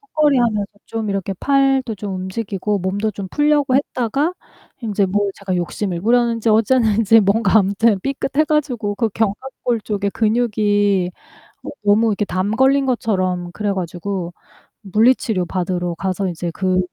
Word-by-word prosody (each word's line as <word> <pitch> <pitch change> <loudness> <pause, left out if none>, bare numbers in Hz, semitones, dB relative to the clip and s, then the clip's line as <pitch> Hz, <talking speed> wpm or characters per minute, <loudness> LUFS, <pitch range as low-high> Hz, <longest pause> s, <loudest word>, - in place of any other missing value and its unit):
턱걸이하면서 265 - +1 0.2
좀 225 -1 -4
이렇게 195 -1 -2
팔도 270 -3 +2
좀 200 -1 -5
움직이고 195 +1 -3
몸도 200 +4 -1
좀 190 -1 -6
풀려고 295 -3 +2
했다가 275 +4 0 0.5
인제 205 -3 0
뭐 205 +1 0
제가 190 -2 -3
욕심을 175 +1 -3
부렸는지 230 0 +2
어쨌는지 225 -1 +4
뭔가 205 +1 +3
아무튼 200 +1 +2
삐끗해 275 +4 0
가지고 260 -9 -1
그 225 +1 0
견갑골 225 +3 -2
쪽에 205 -1 -2
근육이 205 -4 +1 0.5
어 - - -6
너무 210 +3 +4
이렇게 210 -1 0
담 190 0 -2
걸린 270 +2 +3
것처럼 185 -8 -1
그래 205 +2 -2
가지고 180 0 -4 0.5
물리치료 215 -1 +2
받으러 180 -1 -2
가서 190 +1 -2
이제 170 0 -4
그 185 0 0
210 Hz, 325 characters per minute, -19 LUFS, 190-240 Hz, 0.5 s, 어쨌는지